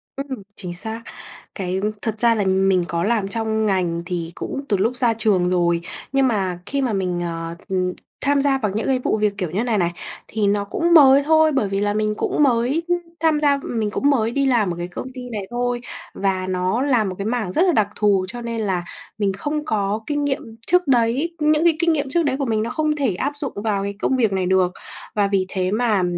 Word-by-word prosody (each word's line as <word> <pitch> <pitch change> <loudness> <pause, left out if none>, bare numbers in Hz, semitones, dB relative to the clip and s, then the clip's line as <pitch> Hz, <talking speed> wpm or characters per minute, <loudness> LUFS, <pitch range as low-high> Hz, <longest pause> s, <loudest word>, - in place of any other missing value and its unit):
Ừm, 270 -5 -5
chính 180 -3 -5
xác. 220 +5 -2 0.5
Cái 185 -1 -2 0.2
thật 220 -2 -2
ra 235 -1 +5
là 205 - +1
mình 190 -1 +3
có 170 0 -1
làm 215 -3 +1
trong 220 0 0
ngành 180 -4 0
thì 170 -2 -3
cũng 275 - -4
từ 200 - +2
lúc 230 +6 0
ra 235 -2 +2
trường 200 -5 +2
rồi. 170 -1 +1 0.3
Nhưng 270 -1 +3
mà 190 -6 -1
khi 280 0 -1
mà 245 -5 0
mình, 180 -2 -1
ờ, 165 0 -4
ừm, 185 -1 0 0.3
tham 280 0 +2
gia 275 -1 +2
vào 210 -6 -1
những 220 - -1
cái 260 -1 +2
vụ 220 - 0
việc 210 -1 +1
kiểu 180 -5 -2
như 205 +6 0
này 230 -4 0
này 175 -2 +1 0.4
thì 210 -2 0
nó 205 0 +1
cũng 340 +11 0
mới 280 -3 +7
thôi. 315 0 +4
Bởi 230 -8 0
vì 195 0 -1
là 205 0 0
mình 215 0 0
cũng 295 - +1
mới 260 +5 +2 0.4
tham 315 -2 +2
gia 285 -1 +3
mình 220 -3 -2
cũng 285 - +1
mới 230 -5 +2
đi 275 +2 +1
làm 220 -9 +2
ở - - -9
cái 175 0 -4
công 180 +8 -7
ty 250 -1 -8
này 215 -3 -4
thôi 245 0 -1 0.3
và 190 -1 -1
nó 185 +6 0
làm 245 -8 +2
một 185 - -5
cái 200 - -4
mảng 220 -5 -1
rất 335 - +1
là 360 - +4
đặc 215 -8 +2
thù, 200 -3 +2
cho 240 +3 -7
nên 230 -1 -3
là 185 -4 -1 0.3
mình 200 -2 0
không 300 +9 -3
có 210 -4 0
kinh 290 -1 -1
nghiệm 265 -5 -3
trước 360 -2 +4
đấy. 260 +7 +2
Những 305 +1 +3
cái 335 -2 +4
kinh 335 -1 +3
nghiệm 285 -3 -1
trước 335 +4 +2
đấy 265 -1 0
của 275 - 0
mình 220 -2 0
nó 230 - -3
không 305 +2 0
thể 260 -11 0
áp 280 +9 -2
dụng 285 -2 -4
vào 200 -3 0
cái 200 0 -4
công 265 - +1
việc 225 -6 +2
này 190 -1 0
được. 185 -1 +2 0.4
Và 205 -1 +2
vì 195 -2 +1
thế 185 0 -1
mà 215 -4 +2
220 Hz, 240 wpm, -21 LUFS, 190-270 Hz, 0.5 s, mới